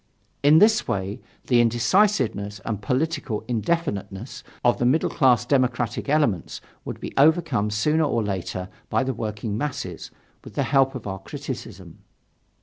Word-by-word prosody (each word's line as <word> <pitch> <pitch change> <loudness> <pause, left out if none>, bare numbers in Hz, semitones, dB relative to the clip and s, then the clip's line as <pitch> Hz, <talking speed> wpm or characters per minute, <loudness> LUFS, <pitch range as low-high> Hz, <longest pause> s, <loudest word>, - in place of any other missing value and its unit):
In 145 +2 +6
this 215 +4 +4
way 95 +1 -3 0.2
the 120 -2 +4
indecisiveness 120 - +2
and 105 -3 -3
political 130 -1 -1
indefiniteness 115 - -2 0.2
of 120 - +3
the - - 0
middle 150 +6 +2
class 125 -6 +3
democratic 125 -2 0
elements 145 - +1 0.3
would - - -6
be - - -7
overcome 145 -7 +3
sooner 150 +10 +2
or 115 -5 0
later 95 -2 -3 0.2
by - - +1
the 130 0 -1
working 105 -1 -4
masses, 120 - -4 0.3
with - - -12
the - - +1
help 135 -2 +2
of 125 - -7
our 95 -1 -4
criticism. 95 - -8
120 Hz, 145 wpm, -24 LUFS, 105-145 Hz, 0.3 s, In